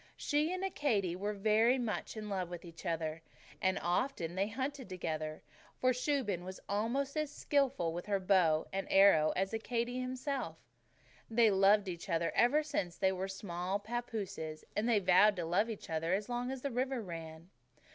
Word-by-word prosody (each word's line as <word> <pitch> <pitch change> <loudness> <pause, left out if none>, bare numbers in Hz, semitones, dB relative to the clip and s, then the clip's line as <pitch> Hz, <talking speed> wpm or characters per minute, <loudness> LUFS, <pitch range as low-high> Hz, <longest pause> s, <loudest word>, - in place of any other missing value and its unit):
She 300 +3 +1
and 370 +1 -3
Accadee 225 - 0
were 205 +3 -3
very 220 +5 +3
much 230 -2 -3
in 215 -1 -5
love 190 -4 -2
with 175 0 -7
each 170 +2 -9
other, 160 -1 -2 0.4
and 190 0 +2
often 175 -1 -1
they 195 +2 0
hunted 260 +1 -4
together, 155 -4 -4 0.4
for 255 - +4
Shuben 250 - -1
was 185 +1 -7
almost 240 +8 -1
as 305 -2 -1
skilful 275 - +1
with 175 +3 -5
her 200 -1 +1
bow 180 -5 +3
and 195 0 -2
arrow 195 -6 +6
as 195 +3 -1
Accadee 235 +2 -2
himself. 260 +2 -3 0.7
They 230 +1 +4
had 215 - +5
loved 195 +1 +5
each 175 +2 -6
other 165 -1 +1
ever 295 +6 +4
since 195 - -3
they 190 - +3
were 190 0 -3
small 190 -1 -3
pappooses, 205 -8 -5
and 220 +3 +1
they 235 - +4
had 200 -3 +1
vowed 200 +4 +6
to 175 -3 -3
love 190 +7 +1
each 220 - -6
other 165 +3 0
as 200 +1 -3
long 245 +1 -2
as 265 -1 -5
the 280 - -1
river 260 +1 -1
ran. 165 -1 -8
200 Hz, 185 wpm, -34 LUFS, 175-245 Hz, 0.7 s, arrow